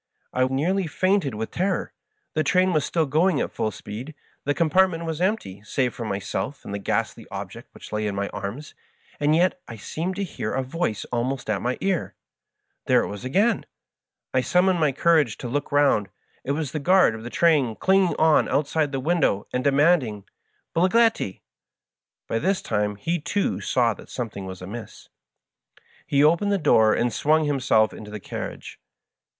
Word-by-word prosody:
I 130 - +2
nearly 165 +8 0
fainted 185 - +1
with 110 +1 -4
terror. 190 +2 -1 0.4
The 155 - +1
train 185 +4 +3
was 155 -3 +2
still 165 +1 0
going 155 +3 +2
at - - -2
full 110 - -1
speed; 115 +8 -8 0.3
the 145 +1 +1
com 165 -3 +1
partment 185 -2 +3
was 160 0 -3
empty, 185 - -1
save 125 +2 -1
for 115 - -6
myself 105 +7 -4
and 100 - -6
the 100 - -3
ghastly 100 - -2
ob - - -6
ject - - -12
which - - -12
lay 105 0 -1
in 100 - -3
my 100 0 -1
arms; 110 +10 -6 0.5
and 150 +1 +3
yet 180 +2 +2
I 115 - -8
seemed 165 - -4
to 200 - -2
hear 185 - -4
a 135 - 0
voice 130 - -2
almost 125 0 -1
at 100 - -1
my 125 +1 -1
ear. 190 -3 -1 0.7
There - - +4
it - - -4
was 100 +2 -7
again 200 - +2 0.7
1 130 - +2
I - - +2
sum 180 +7 +2
moned 180 -4 +2
up 140 -3 +1
courage 155 -9 +3
to 125 - -6
look 145 +4 -3
round. 140 -9 +3 0.3
It 140 - -1
was 150 -2 -3
the 155 - -3
guard 185 -4 +4
of 110 - -7
the 120 - -6
train 145 -7 +2
clinging 190 - +3
on 160 -1 +4
outside 150 +1 0
the 135 - -2
window 145 - +1
and 125 - 0
demanding 140 - +2 0.5
"Bigliettil" 190 - +2 0.9
By 115 - -1
this 190 +6 0
time 105 0 -1
he, 165 +12 -2
too, 150 - -1
saw 120 +2 +2
that - - -14
something 110 -6 -5
was 95 -1 -8
amiss. 110 +5 -9 1.0
He 140 0 +3
opened 170 +7 +3
the 200 - +3
door 110 - +4
and 120 -1 0
swung 155 +5 +2
himself 125 -7 +2
into 105 - -10
the 105 0 -6
carriage. - - -7
145 Hz, 185 wpm, -24 LUFS, 110-170 Hz, 1.0 s, There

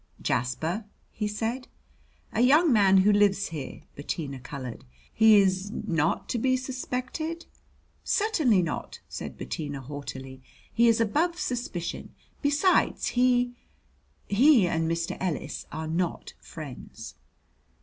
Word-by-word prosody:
"Jasper?" 160 - -1 0.3
he 210 - -2
said. 225 +5 -3 0.7
"A 225 - +1
young 295 +4 +5
man 195 -3 +5
who 210 - +6
lives 200 -1 +3
here." 155 -4 -7
Bettina 145 -1 -4
colored. 130 -2 -7 0.3
"He 220 -1 +7
is 190 0 +1
not 165 -6 -1
to 240 - -1
be 255 +2 +2
suspected?" 260 +5 -4 0.6
"Certainly 315 - +2
not," 165 - -4
said - - -7
Bettina 145 -3 -5
haughtily; 135 -1 -8 0.3
"he 235 +1 +4
is 230 0 +4
above 320 - +1
suspicion. 235 - -4 0.3
Besides, 300 +6 +2
he 245 0 +2 0.7
he 235 -1 +5
and 165 -1 0
Mr. 165 0 -2
Ellis 180 -6 -3
are 160 +1 -4
not 170 +2 -2
friends." 150 -6 -9
205 Hz, 120 wpm, -27 LUFS, 160-250 Hz, 0.7 s, He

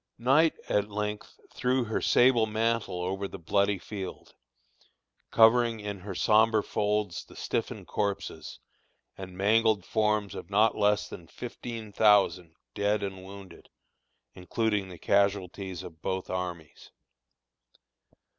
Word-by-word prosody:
Night 135 +7 +3
at 105 0 0
length 105 0 -5
threw 130 0 +1
her 110 -1 -2
sable 120 -3 +4
mantle 110 -4 -1
over 95 +2 -2
the - - -9
bloody 100 +4 +1
field, 95 +1 -8 1.0
covering 115 0 +4
in 105 -1 -5
her 95 0 -7
sombre 110 +1 +3
folds 105 -4 -1
the - - -17
stiffened - - -3
corpses 100 -2 -3 0.6
and 95 -1 -9
mangled 110 0 +3
forms 105 -2 0
of 85 - -8
not 105 +2 +3
less 105 0 +2
than 85 - -10
fifteen 115 0 -7
thousand 100 -6 +3 0.2
dead 100 0 0
and 95 -1 -5
wounded, 95 -2 -12 0.6
including 100 +2 -1
the 90 - -10
casualties 100 -1 0
of 80 -2 -11
both 95 0 -3
armies. 90 -4 -6
105 Hz, 120 wpm, -28 LUFS, 95-110 Hz, 1.0 s, sable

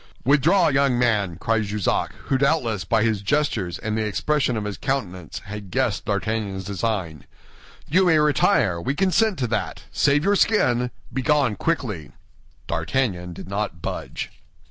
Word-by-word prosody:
"Withdraw, 150 +8 +4
young 135 -3 +2
man," 105 -8 +1
cried 105 +4 0
Jussac, 105 -1 -1
who 135 - 0
doubtless, 130 - +1
by 110 -1 +2
his 110 -3 +1
gestures 110 - 0
and 110 -1 -3
the 110 - 0
expression 125 +4 0
of 110 - -2
his 105 -2 -5
countenance, 95 - -3
had 105 -1 -7
guessed 130 -1 0
D'Artagnan's 100 -1 -2
design. 95 -6 -3 0.6
"You 185 +4 +3
may 160 -2 +5
retire; 145 - +3
we 135 +11 -1
consent 195 +3 +2
to 125 - -1
that. - - -2
Save 145 +1 +2
your 200 +2 +3
skin; 125 - +2 0.2
begone 135 -3 +2
quickly." 105 - -2 0.5
D'Artagnan 90 +1 -1
did 85 - -9
not 100 -3 -3
budge. - - -4
115 Hz, 145 wpm, -23 LUFS, 100-140 Hz, 0.6 s, may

